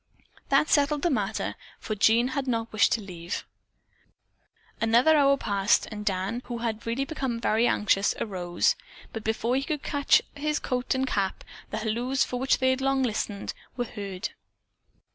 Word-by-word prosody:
That 275 Hz, +2 st, +4 dB
settled 290 Hz, -1 st, +2 dB
the 345 Hz, -, +2 dB
matter, 215 Hz, -5 st, -1 dB, 0.3 s
for 215 Hz, -, -4 dB
Jean 225 Hz, +4 st, +4 dB
had 270 Hz, 0 st, -2 dB
not 230 Hz, -2 st, -1 dB
wished 215 Hz, -, +4 dB
to 230 Hz, -, 0 dB
leave. 175 Hz, -3 st, -6 dB, 1.4 s
Another 235 Hz, +8 st, +5 dB
hour 280 Hz, -1 st, +5 dB
passed, 200 Hz, -4 st, +2 dB
and 210 Hz, -1 st, -5 dB
Dan, 200 Hz, +4 st, -1 dB
who 240 Hz, -1 st, -4 dB
had 230 Hz, -1 st, -3 dB
really 250 Hz, +4 st, 0 dB
become 265 Hz, -5 st, -3 dB
very 230 Hz, +1 st, +2 dB
anxious, 200 Hz, -3 st, +2 dB
arose, 175 Hz, -4 st, 0 dB, 0.4 s
but 225 Hz, -, -5 dB
before 225 Hz, +3 st, 0 dB
he 270 Hz, -, +1 dB
could 300 Hz, -1 st, -3 dB
get 285 Hz, -1 st, +3 dB
his 300 Hz, +1 st, -1 dB
coat 250 Hz, +1 st, -1 dB
and 260 Hz, 0 st, +1 dB
cap, 195 Hz, -6 st, -1 dB, 0.3 s
the -, -, -3 dB
halloos 235 Hz, +5 st, 0 dB
for 250 Hz, -, -3 dB
which 265 Hz, +1 st, +2 dB
they 260 Hz, 0 st, +3 dB
had 260 Hz, 0 st, -1 dB
long 270 Hz, 0 st, +2 dB
listened 210 Hz, -4 st, -2 dB, 0.2 s
were 245 Hz, -, 0 dB
heard. 200 Hz, -4 st, -5 dB
235 Hz, 165 wpm, -27 LUFS, 210-265 Hz, 1.4 s, Another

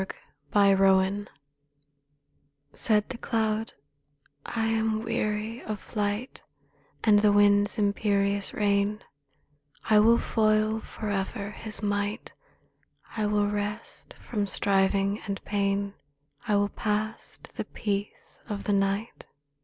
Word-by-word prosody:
43 200 Hz, -1 st, +5 dB
THE -, -, +2 dB
CLOUD 195 Hz, +1 st, +3 dB, 1.4 s
Said 210 Hz, -2 st, +2 dB
the 245 Hz, -, -6 dB
cloud, 220 Hz, -2 st, -1 dB, 0.7 s
"I 225 Hz, -1 st, -1 dB
am 220 Hz, -1 st, 0 dB
weary 225 Hz, 0 st, -2 dB
of 215 Hz, -2 st, -5 dB
flight 210 Hz, +5 st, -3 dB, 0.6 s
And 210 Hz, -2 st, +6 dB
the 210 Hz, 0 st, +4 dB
wind's 205 Hz, +1 st, +4 dB
imperious 200 Hz, -1 st, +1 dB
reign: 205 Hz, 0 st, 0 dB, 0.8 s
I 215 Hz, -1 st, +6 dB
will 230 Hz, +2 st, +6 dB
foil 215 Hz, -1 st, +2 dB
forever 205 Hz, -1 st, -4 dB
his 215 Hz, 0 st, -4 dB
might; 205 Hz, +2 st, -2 dB, 0.8 s
I 215 Hz, -2 st, 0 dB
will 205 Hz, 0 st, +2 dB
rest 205 Hz, +2 st, -4 dB
from 205 Hz, -4 st, -2 dB
striving 195 Hz, +1 st, +1 dB
and 200 Hz, -1 st, -3 dB
pain; 200 Hz, 0 st, 0 dB, 0.5 s
I 210 Hz, -, +2 dB
will 205 Hz, 0 st, +2 dB
pass 215 Hz, +1 st, -2 dB
to -, -, -13 dB
the -, -, -3 dB
peace 205 Hz, -1 st, -4 dB
of 205 Hz, -1 st, -4 dB
night.' 200 Hz, +2 st, 0 dB
205 Hz, 115 wpm, -27 LUFS, 200-215 Hz, 1.4 s, And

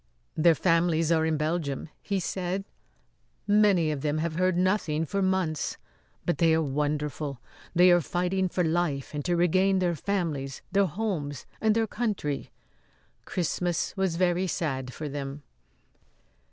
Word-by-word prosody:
"Their 165 Hz, +1 st, +5 dB
families 165 Hz, -1 st, +2 dB
are 160 Hz, -1 st, +3 dB
in 160 Hz, -1 st, +1 dB
Belgium," 150 Hz, -2 st, -2 dB
he 200 Hz, -1 st, -1 dB
said. 185 Hz, +2 st, -2 dB, 0.8 s
"Many 205 Hz, -6 st, +4 dB
of 145 Hz, -3 st, -3 dB
them 150 Hz, +1 st, 0 dB
have 160 Hz, +1 st, -1 dB
heard 185 Hz, 0 st, +2 dB
nothing 180 Hz, -4 st, +1 dB
for 200 Hz, +5 st, -1 dB
months. 185 Hz, -5 st, 0 dB, 0.5 s
But 175 Hz, -, 0 dB
they 165 Hz, -2 st, +5 dB
are 160 Hz, -, +2 dB
wonderful. 145 Hz, -1 st, -2 dB, 0.4 s
They 180 Hz, +1 st, +7 dB
are 175 Hz, 0 st, +5 dB
fighting 180 Hz, +3 st, 0 dB
for 180 Hz, -, 0 dB
life 160 Hz, -5 st, -1 dB
and 145 Hz, -1 st, -3 dB
to 175 Hz, -1 st, +2 dB
regain 185 Hz, +3 st, +3 dB
their 180 Hz, -2 st, +1 dB
families, 155 Hz, -7 st, -2 dB
their 200 Hz, -1 st, +3 dB
homes 160 Hz, -, -3 dB, 0.2 s
and 220 Hz, -1 st, +3 dB
their 225 Hz, 0 st, +2 dB
country. 210 Hz, -, -2 dB, 0.8 s
Christmas 175 Hz, -1 st, -1 dB
was 190 Hz, -4 st, 0 dB
very 180 Hz, +1 st, +1 dB
sad 135 Hz, -6 st, -2 dB
for 150 Hz, +3 st, -6 dB
them." 140 Hz, 0 st, -5 dB
170 Hz, 145 wpm, -27 LUFS, 150-185 Hz, 0.8 s, They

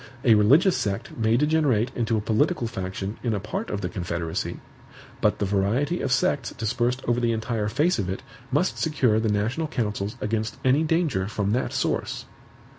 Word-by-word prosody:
A 120 Hz, -, +6 dB
religious 140 Hz, -, +5 dB
sect 105 Hz, +3 st, -3 dB
may 115 Hz, 0 st, +2 dB
degenerate 145 Hz, -6 st, +2 dB
into 115 Hz, -2 st, 0 dB
a -, -, 0 dB
political 120 Hz, +7 st, +1 dB
faction 95 Hz, 0 st, -4 dB
in 115 Hz, -3 st, 0 dB
a -, -, -1 dB
part 105 Hz, -, -4 dB
of 105 Hz, -, -3 dB
the 90 Hz, -, -1 dB
Confederacy; 85 Hz, -2 st, -3 dB, 0.6 s
but -, -, +3 dB
the 105 Hz, -, 0 dB
variety 105 Hz, -, 0 dB
of 130 Hz, -, -1 dB
sects 130 Hz, -1 st, +1 dB
dispersed 120 Hz, +3 st, -1 dB
over 120 Hz, 0 st, +2 dB
the 120 Hz, -1 st, +1 dB
entire 110 Hz, -1 st, -1 dB
face 145 Hz, +8 st, +1 dB
of 95 Hz, -3 st, -1 dB
it 95 Hz, +7 st, -4 dB, 0.3 s
must 150 Hz, +8 st, +1 dB
secure 130 Hz, -9 st, +2 dB
the 110 Hz, -1 st, 0 dB
national 115 Hz, +10 st, 0 dB
councils 105 Hz, -7 st, -2 dB
against 110 Hz, +1 st, -2 dB
any 130 Hz, +4 st, +4 dB
danger 155 Hz, -, +1 dB
from 105 Hz, -1 st, -1 dB
that 125 Hz, +4 st, 0 dB
source. -, -, -1 dB
115 Hz, 180 wpm, -25 LUFS, 105-135 Hz, 0.6 s, A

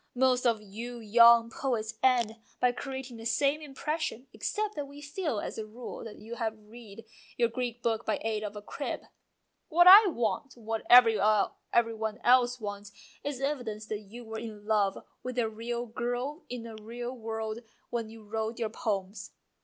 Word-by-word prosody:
Most 255 Hz, 0 st, +3 dB
of 220 Hz, -2 st, +1 dB
you 230 Hz, +4 st, -7 dB
young 230 Hz, +1 st, +6 dB
poets 225 Hz, -5 st, -2 dB
end 240 Hz, -4 st, +3 dB, 0.2 s
by 250 Hz, -, +4 dB
creating 265 Hz, -1 st, -6 dB
the 225 Hz, -, -9 dB
same 280 Hz, +5 st, +2 dB
impression, 300 Hz, -2 st, -3 dB
except 425 Hz, 0 st, -2 dB
that 290 Hz, -1 st, -4 dB
we 285 Hz, +1 st, -12 dB
feel 295 Hz, -, -3 dB
as -, -, -5 dB
a 220 Hz, -, -4 dB
rule 235 Hz, +3 st, -8 dB
that 220 Hz, -, -9 dB
you 230 Hz, +2 st, -8 dB
have 220 Hz, -2 st, -2 dB
read 215 Hz, 0 st, -13 dB, 0.3 s
your 235 Hz, -1 st, +3 dB
Greek 240 Hz, 0 st, -4 dB
book 230 Hz, -1 st, 0 dB
by 215 Hz, -, 0 dB
aid 220 Hz, -1 st, -1 dB
of 210 Hz, -1 st, -5 dB
a 205 Hz, -, -7 dB
crib." -, -, -4 dB, 0.4 s
:< -, -, -50 dB
What 350 Hz, -, +8 dB
I 395 Hz, +4 st, +11 dB
want, 245 Hz, -, -2 dB
what 225 Hz, -1 st, -4 dB
every 235 Hz, -3 st, +8 dB, 0.7 s
one 220 Hz, -1 st, -3 dB
else 250 Hz, 0 st, +4 dB
wants, 205 Hz, -1 st, -6 dB, 0.3 s
is 285 Hz, -2 st, -4 dB
evidence 245 Hz, -7 st, -2 dB
that 215 Hz, -, -2 dB
you 225 Hz, +4 st, -11 dB
were 220 Hz, 0 st, -5 dB
in 215 Hz, -2 st, -8 dB
love 205 Hz, -3 st, +2 dB, 0.2 s
with 255 Hz, 0 st, -5 dB
a 235 Hz, -2 st, +2 dB
real 235 Hz, +2 st, -4 dB
girl 245 Hz, +7 st, -3 dB
in 245 Hz, -2 st, -5 dB
a 230 Hz, -, -8 dB
real 240 Hz, +3 st, -6 dB
world 220 Hz, -1 st, -4 dB, 0.3 s
when 230 Hz, -2 st, -2 dB
you 225 Hz, 0 st, -12 dB
wrote 220 Hz, +2 st, -3 dB
your 225 Hz, -2 st, -1 dB
poems. 195 Hz, -2 st, -3 dB
230 Hz, 180 wpm, -30 LUFS, 220-250 Hz, 0.7 s, I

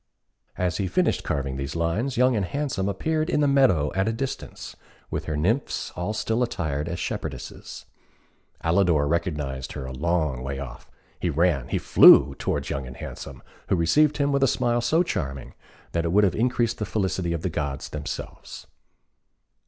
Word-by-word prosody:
As 90 Hz, -3 st, 0 dB
he 95 Hz, -, -1 dB
finished -, -, +1 dB
carving 70 Hz, -1 st, -2 dB
these 70 Hz, +2 st, -4 dB
lines, 95 Hz, +11 st, -1 dB
Young 125 Hz, 0 st, +4 dB
and 105 Hz, -, +1 dB
Handsome 125 Hz, -3 st, -2 dB
appeared 155 Hz, -, -1 dB
in 165 Hz, -, +1 dB
the 145 Hz, -, +3 dB
meadow 130 Hz, -, +3 dB
at 95 Hz, +2 st, +1 dB
a -, -, +2 dB
distance, 125 Hz, +4 st, -5 dB, 0.4 s
with -, -, -3 dB
her 75 Hz, -1 st, -2 dB
nymphs 110 Hz, -, 0 dB
all 90 Hz, +5 st, -3 dB
still 110 Hz, +2 st, -1 dB
attired 80 Hz, -, -2 dB
as 85 Hz, -, -3 dB
shepherdesses. -, -, -6 dB, 0.8 s
Alidor 80 Hz, -4 st, +3 dB
recognised 75 Hz, -5 st, -2 dB
her 65 Hz, -, -6 dB
a 65 Hz, -, -6 dB
long 75 Hz, -2 st, 0 dB
way 70 Hz, +1 st, -4 dB
off. 65 Hz, -3 st, -8 dB, 0.3 s
He 90 Hz, -, 0 dB
ran 80 Hz, -4 st, +1 dB
he -, -, -1 dB
flew -, -, +7 dB
towards -, -, -2 dB
Young 70 Hz, -1 st, -3 dB
and 65 Hz, -, -10 dB
Handsome, 70 Hz, -3 st, -8 dB, 0.2 s
who -, -, +2 dB
received 150 Hz, -, +3 dB
him 140 Hz, -1 st, +1 dB
with 140 Hz, 0 st, +1 dB
a 135 Hz, -, +5 dB
smile 120 Hz, -1 st, +1 dB
so 160 Hz, +9 st, +3 dB
charming, 70 Hz, -, -4 dB, 0.4 s
that 85 Hz, -, 0 dB
it 85 Hz, -, -1 dB
would 105 Hz, +3 st, +4 dB
have 95 Hz, -, +3 dB
increased 120 Hz, 0 st, 0 dB
the 105 Hz, -, -1 dB
felicity 95 Hz, -5 st, -1 dB
of 85 Hz, -1 st, -3 dB
the 95 Hz, -, 0 dB
gods 70 Hz, -4 st, -3 dB
themselves. -, -, -7 dB
90 Hz, 175 wpm, -25 LUFS, 75-120 Hz, 0.8 s, flew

